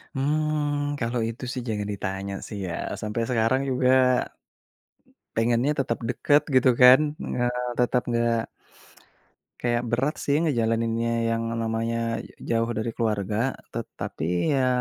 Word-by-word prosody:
Hmm, 145 0 0
kalau 120 0 -1
itu 115 +3 -8
sih 130 -2 -4
jangan 105 -2 -2
ditanya 95 0 -4
sih 105 - -7
ya. 85 - -4 0.3
Sampai 105 +2 -2
sekarang 120 +2 +2
juga, 125 0 +2 1.5
pengennya 120 +4 +2
tetap 120 -3 0
deket 145 +4 +3
gitu 130 0 +5
kan. 125 +2 +10 0.3
Nga 125 - -1 0.4
tetap 125 0 +2
nggak 115 0 +2 1.3
kayak 120 -1 +1
berat 130 +6 0
sih 145 +1 +1
ngejalaninnya 115 -5 +1 0.2
yang 115 - -1 0.2
namanya 115 0 -1 0.2
ja 115 -1 -1
jauh 115 - -1
dari 110 +1 -2
keluarga. 110 +2 -1 0.2
Tetapi 90 - -2
ya 130 -2 +2
115 Hz, 125 wpm, -25 LUFS, 115-130 Hz, 1.5 s, kan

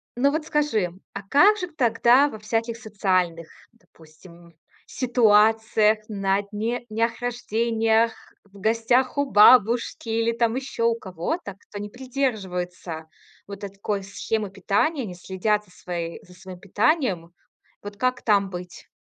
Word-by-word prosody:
Но 280 +3 +2
вот 310 0 -2
скажи, 260 - 0 0.2
а 195 - -5
как 385 - +5
же 360 - -4
к 320 - -22
тогда 240 +3 +4
во 220 - -8
всяких 225 +2 -2
социальных, 185 -7 -1 0.2
допустим, 170 -4 -19 0.3
ситуациях, 220 -2 +3
на 195 -2 0
дне 220 +4 -4
днях 225 +1 -1
рождениях, 230 -1 +1 0.3
в 200 0 -17
гостях 230 +5 +1
у 285 -1 0
бабушки 235 +1 +5
или 230 +1 +1
там 230 0 0
ещё 260 -3 -1
у 230 - +2
кого-то, 195 - -5
кто 205 - -10
не 205 0 -6
придерживается 190 -10 -4 0.4
вот 200 0 -9
этой 200 0 -7
такой 200 0 -3
схемы 205 +1 -3
питания, 210 - 0
не 180 -4 -8
следят 205 +4 -1
за 180 - -23
свои 170 -2 -6
за 180 - -17
своим 185 0 -11
питанием. 200 - 0 0.5
Вот 205 0 -8
как 255 +1 0
там 200 -3 +2
быть? 180 -1 -9
215 Hz, 140 wpm, -24 LUFS, 195-240 Hz, 0.5 s, как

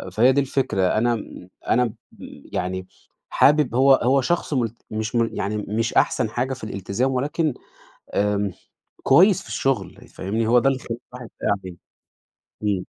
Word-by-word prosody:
فهي 125 +4 +5
دي 140 - +2
الفكرة 130 -7 -1 0.2
أنا 120 +2 +2
م 105 -4 -9 0.2
أنا 125 +2 +4
م 115 - -5 0.6
يعني، 95 0 -3 0.4
حابب 145 -4 +3
هو 135 +2 +6
هو 135 +2 +2
شخص 170 +2 -1
مل 120 -5 0 0.2
مش 110 +2 -3
مل 115 -1 +2
يعني 105 +2 -2
مش 110 +3 -2
أحسن 110 - +2
حاجة 125 +3 -2
في 130 - -10
الالتزام، 110 +5 -2
ولكن 145 +3 0 0.6
آمم 105 0 +1 0.5
كويس 180 +7 +5
في - - -15
الشغل 100 -8 -2
فاهمني؟ 110 +4 -2
هو 120 +2 +5
ده 130 +3 +3
اللي 135 -1 0
يخلي 115 0 -5 0.2
الواحد 125 -2 -8
باقي - - +1
عليه، 90 -2 -8 0.9
إمم. 100 -3 0
120 Hz, 160 wpm, -23 LUFS, 105-130 Hz, 0.9 s, هو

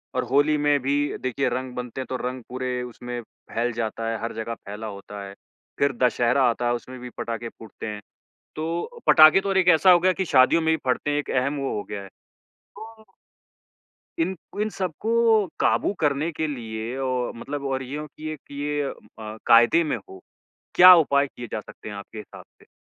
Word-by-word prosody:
और 130 - +1
होली 145 +2 +3
में 145 -1 +2
भी 140 +3 0 0.2
देखिए 130 +1 -1
रंग 130 +1 -4
बनते 125 +1 -5
हैं - - -5
तो 130 - -2
रंग 125 -1 -6
पूरे 125 0 -3
उसमें 120 0 -7
फैल 115 +1 -4
जाता 115 0 -3
है, 115 - -2
हर 115 - -3
जगह 115 +1 -4
फैला 105 +2 -8
होता 100 0 -8
है, 100 - -10 0.5
फिर 140 -1 +2
दशहरा 125 +2 +3
आता 120 +1 -2
है 120 - +2
उसमें 125 +1 -8
भी 125 - -8
पटाखे 115 0 -4
फूटते 110 0 -10
हैं। 105 -1 -6 0.5
तो 170 - -4
पटाखे 155 +4 +8
तो 200 - -3
और 195 - +1
एक 185 -1 +3
ऐसा 180 +3 +6
हो 175 - +7
गया 185 +1 +3
कि 190 - -2
शादियों 140 +2 +4
में 160 0 +2
भी - - -5
फटते 145 - -1
हैं 145 - 0
एक - - -6
अहम 140 +3 0
वो 135 - -2
हो 105 - -3
गया 100 - -5
है। 95 - -11 0.5
तो 220 0 -14 1.1
इन 185 +3 0 0.3
इन 215 - 0
सबको 190 +4 -3 0.5
काबू - - +2
करने 150 +2 +1
के 155 0 -2
लिए 115 -2 -5
ओ 125 -1 -1
मतलब 140 +4 -6
और 135 0 -2
यो 145 +4 -5
कि 155 - -5 0.3
ये 145 0 -1
अ, 110 -5 -8
कायदे 120 +8 +6
में 150 - -1
हो, 380 0 -14 0.5
क्या 180 +1 +10
उपाय 140 -4 +3
किए 120 -2 -9
जा - - -2
सकते 105 - -11
हैं 105 - -7
आपके 100 +2 -10
हिसाब 105 - -10 0.2
से? - - -21
130 Hz, 200 wpm, -24 LUFS, 115-155 Hz, 1.1 s, क्या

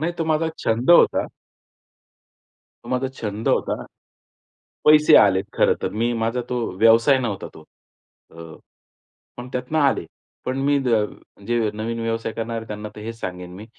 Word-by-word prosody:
नाही, 170 +3 -1
तो 165 - 0
माझा 160 0 0
छंद 115 +7 0
होता. 175 - +5 1.6
तो 120 - -9
माझा 130 +1 -1
छंद 110 -4 -5
होता. - - 0 1.0
पैसे 150 0 +7
आलेत 95 -1 +4
खरं - - +3
तर. - - -1
मी 115 +3 -1
माझा 115 +2 -1
तो 125 - -1 0.2
व्यवसाय 115 +5 +5
नव्हता 110 -6 -4
तो. - - -13 0.7
अ, - - -18 1.0
पण 125 +1 -8
त्यातनं 125 +5 -1
आले. 140 - +2 0.4
पण 130 +1 -2
मी 145 0 +3 0.7
जे 120 0 +1 0.2
नवीन 115 +2 -4
व्यवसाय 115 -1 -3
करणारे 115 0 -4
आहेत 110 0 -7
त्यांना 105 0 -6
तर - - -9
हेच 115 +1 -7
सांगेन 90 -2 -6
मी, 105 +3 -10
115 Hz, 150 wpm, -22 LUFS, 110-135 Hz, 1.6 s, पैसे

